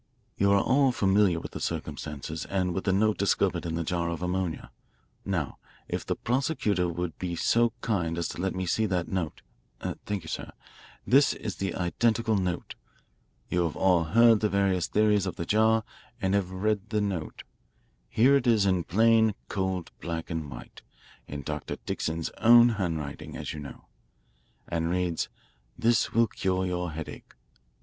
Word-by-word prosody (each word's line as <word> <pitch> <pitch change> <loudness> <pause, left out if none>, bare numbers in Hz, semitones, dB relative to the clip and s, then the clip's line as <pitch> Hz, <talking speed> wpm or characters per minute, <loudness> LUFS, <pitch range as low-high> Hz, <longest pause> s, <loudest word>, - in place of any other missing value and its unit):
You 100 0 +3
are 100 - +5
all 135 +4 +3
familiar 95 -5 +3
with - - -8
the - - -6
circumstances 75 +1 -4
and 90 -2 -1
with 95 - -3
the 95 - +3
note 105 +2 +2
discovered 100 -3 +1
in 80 - -2
the 85 - -1
jar 85 0 -1
of 85 +1 -4
ammonia. 90 -2 -2 0.5
Now, 85 -8 -2 0.3
if - - -3
the - - -2
prosecutor 120 - 0
will 85 0 -3
be 90 -2 -3
so 120 +6 +3
kind 85 -7 -1
as 85 - -1
to - - -5
let 95 0 -1
me 95 0 -2
see 110 +5 +1
that 90 -3 -1
note 90 -6 -3 0.4
thank 100 -3 -4
you, - - -11
sir. - - -5 0.5
This 140 +3 +5
is 100 -5 -5
the 95 -2 -2
identical 110 +5 +1
note. 90 -3 -2 0.7
You 90 0 +1
have 80 - -3
all 90 -3 +3
heard 115 +5 +5
the 105 - +1
various 95 -3 +1
theories 105 -2 +2
of 95 - -4
the 85 - -4
jar 110 +2 +3 0.4
and 95 -2 0
have 100 -3 +1
read 105 +2 -1
the 110 - 0
note. 95 -6 -3 0.7
Here 130 - +5
it 135 -3 +1
is 110 -4 +4
in 95 -3 +1
plain, 110 +1 +4
cold 95 -3 -2
black 85 -1 -4
and 80 -3 -3
white - - -10 0.5
in 70 -1 -6
Dr. - - -4
Dixon's 80 0 -2
own 120 +1 +8
handwriting, 80 -9 -3
as - - -5
you 75 - -6
know, 70 -2 -10 0.8
and 85 0 -1
reads: 90 -2 -1 0.5
'This 115 -1 +2
will 115 +1 +4
cure 95 -3 -1
your 90 -1 -2
headache. 80 0 -7
Dr. - - -24
95 Hz, 170 wpm, -28 LUFS, 85-110 Hz, 0.8 s, own